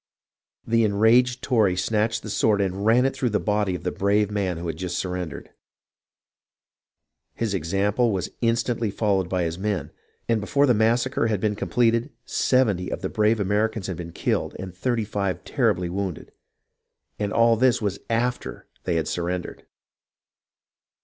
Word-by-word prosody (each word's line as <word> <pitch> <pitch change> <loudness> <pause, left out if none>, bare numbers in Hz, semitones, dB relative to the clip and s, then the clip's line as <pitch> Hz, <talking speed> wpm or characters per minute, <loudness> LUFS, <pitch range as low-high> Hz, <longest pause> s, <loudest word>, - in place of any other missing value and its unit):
The 115 0 +2
enraged 115 +4 +3
Tory 110 -8 +2
snatched 110 +4 0
the 110 - -6
sword 105 0 +2
and 100 +1 -1
ran 120 +3 +5
it 135 - +1
through 130 -2 0
the 105 - +1
body 105 -3 0
of - - -7
the - - -1
brave 105 +1 +1
man 95 -4 -1
who 85 - -6
had 80 - -3
just 90 +1 -4
surrendered. 90 -3 -4 1.8
His 115 -3 -2
example 100 +7 +1
was 95 -3 -2
instantly 115 -1 0
followed 100 -3 0
by 90 -1 0
his 85 +1 -3
men, 105 0 -2 0.4
and 115 -2 +1
before 140 +7 +2
the 125 - +4
massacre 115 +2 +2
had 105 -3 0
been 105 +1 0
completed, 115 +4 +1 0.2
70 105 -9 +1
of - - -4
the - - -2
brave 110 +1 +2
Ameri 105 +2 +1
cans 105 -5 -5
had 95 -3 -4
been 85 -1 -7
killed - - -1
and 95 -2 -7
35 105 -4 -2
terribly 90 0 0
wounded. 95 -1 -4 0.9
And 105 -1 -1
all 115 +1 +4
this 125 +2 +3
was 100 -3 -2
after 115 - -2 0.2
they 85 - 0
had 80 -2 0
surrendered 90 +1 -4
105 Hz, 160 wpm, -24 LUFS, 95-115 Hz, 1.8 s, ran